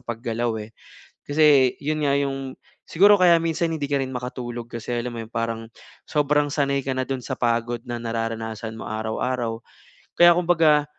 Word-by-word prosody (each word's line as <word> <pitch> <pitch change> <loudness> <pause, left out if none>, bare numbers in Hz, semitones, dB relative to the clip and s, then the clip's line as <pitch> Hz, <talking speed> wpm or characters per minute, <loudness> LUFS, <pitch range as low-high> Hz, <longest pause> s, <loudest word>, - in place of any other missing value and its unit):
paggalaw, 115 0 -2
eh. 105 +1 -10 0.5
Kasi 145 -3 +4
iyon 155 +2 -1
nga 140 - +2
iyong 135 -1 -3 0.3
siguro 205 +4 +5
kaya 175 -3 +5
minsan 165 0 -1
hindi 150 -3 -2
ka 140 - +2
rin 130 0 -4
makatulog 120 -1 -6
kasi 115 +1 -5
alam 120 +1 -2
mo 115 - -6
iyon 110 - -19
parang 115 -1 -2 0.5
sobrang 150 -1 +1
sanay 140 -2 +1
ka 135 - -1
na 130 - -1
doon 130 0 -4
sa 130 - -3
pagod 120 -1 -1
na 120 -2 -5
nararanasan 115 -1 -4
mo - - -7
araw-araw. 115 +2 -2 0.6
Kaya 175 0 +7
kumbaga, 165 -4 +3
130 Hz, 170 wpm, -23 LUFS, 115-150 Hz, 0.6 s, Kaya